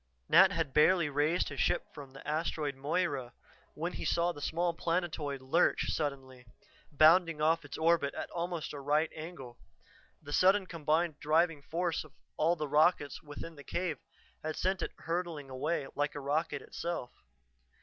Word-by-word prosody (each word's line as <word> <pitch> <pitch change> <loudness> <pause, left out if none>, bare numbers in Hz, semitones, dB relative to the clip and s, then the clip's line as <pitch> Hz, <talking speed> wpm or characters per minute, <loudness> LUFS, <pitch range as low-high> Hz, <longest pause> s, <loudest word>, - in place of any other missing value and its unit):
Nat 190 +1 +7
had 165 -7 -2
barely 165 +1 +4
raised 150 +5 +1
his 145 -2 -7
ship - - +1
from 145 -3 -9
the 135 +1 -13
Asteroid 155 -1 -1
Moira 140 -3 -1 0.4
when 170 +3 -3
he - - -5
saw 170 +1 +1
the 145 - -10
small 170 +4 0
planetoid 165 -5 -2
lurch 160 +7 +2
suddenly, 135 -4 -4 0.5
bounding 160 +2 +5
off 160 +2 +2
its 145 0 -8
orbit 160 -3 +2
at - - -5
almost 170 -2 -3
a 145 - -6
right 150 +3 +1
angle. 155 -7 -9 0.6
The 145 -1 -8
sudden 190 +3 +4
combined 160 -1 0
driving 160 0 +2
force 170 +3 -2
of 155 -2 -17 0.2
all 165 +3 +2
the 155 -3 -3
rockets 150 -1 +2
within 150 +2 -8
the 145 -2 -12
cave 170 -4 -2 0.4
had 155 0 -3
sent 190 0 0
it - - -2
hurtling 165 -5 -4
away 145 +3 -1
like 145 +1 -1
a - - -4
rocket 145 +1 -1
itself. 170 -8 -4
155 Hz, 160 wpm, -32 LUFS, 145-170 Hz, 0.6 s, Nat